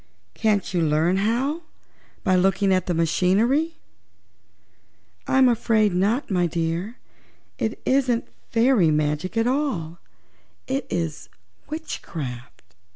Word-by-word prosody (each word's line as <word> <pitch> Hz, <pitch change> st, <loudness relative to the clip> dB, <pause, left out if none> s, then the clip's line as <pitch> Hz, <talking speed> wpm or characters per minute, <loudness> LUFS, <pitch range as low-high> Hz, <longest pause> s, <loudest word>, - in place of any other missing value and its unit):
"Can't 210 Hz, -4 st, 0 dB
you 175 Hz, -, +1 dB
learn 160 Hz, +4 st, +2 dB
how, 245 Hz, -, 0 dB, 0.6 s
by 185 Hz, -, +3 dB
looking 195 Hz, +1 st, +3 dB
at 185 Hz, -1 st, 0 dB
the 180 Hz, -, +1 dB
machinery?" 215 Hz, -, +2 dB, 1.5 s
"I'm 265 Hz, -1 st, +5 dB
afraid 220 Hz, -4 st, +2 dB
not, 205 Hz, +8 st, 0 dB
my 180 Hz, -2 st, +2 dB
dear. 170 Hz, +7 st, -3 dB, 0.6 s
It 220 Hz, -, -2 dB
isn't 260 Hz, -3 st, +1 dB, 0.2 s
fairy 230 Hz, -7 st, +3 dB
magic 150 Hz, +6 st, -1 dB
at 225 Hz, -, +2 dB
all; 245 Hz, -, -1 dB, 0.7 s
it 270 Hz, +1 st, -2 dB
is 165 Hz, -2 st, -3 dB, 0.4 s
witchcraft." 140 Hz, -, -7 dB
195 Hz, 105 wpm, -23 LUFS, 170-245 Hz, 1.5 s, I'm